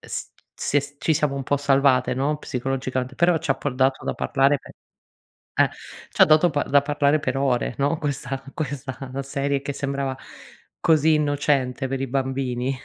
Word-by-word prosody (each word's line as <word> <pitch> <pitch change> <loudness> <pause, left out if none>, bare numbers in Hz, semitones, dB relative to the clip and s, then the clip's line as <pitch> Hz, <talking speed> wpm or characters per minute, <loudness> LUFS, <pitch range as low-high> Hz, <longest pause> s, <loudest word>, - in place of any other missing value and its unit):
s - - -5 0.2
se 145 - +1
s 145 +1 -10
ci 160 - +1
siamo 150 -2 +1
un 140 - -3
po' 145 +2 0
salvate, 135 -3 +3
no, 140 +4 0
psicologicamente, 130 0 -3
però 170 +3 +3
ci 145 - -4
ha - - +4
por 140 -3 -3
dato 130 +1 +1
da - - -2
parlare 140 +1 +2
per - - -14 0.9
eh, - - +5 0.4
ci - - -1
ha - - +10
dato 155 +3 +5
pa 145 -3 0
da 140 +1 +4
parlare 145 +1 +2
per 130 -2 -2
ore, 125 -3 0
no, 140 +3 +1
questa 135 -2 -3
questa 140 -3 -4 0.2
serie 140 0 -1
che 140 - -4
sembrava, 135 -1 -3 0.6
così 160 -1 +4
innocente 145 -3 +1
per 135 0 -3
i 135 - -2
bambini 130 -1 -1
140 Hz, 180 wpm, -23 LUFS, 130-145 Hz, 0.9 s, ha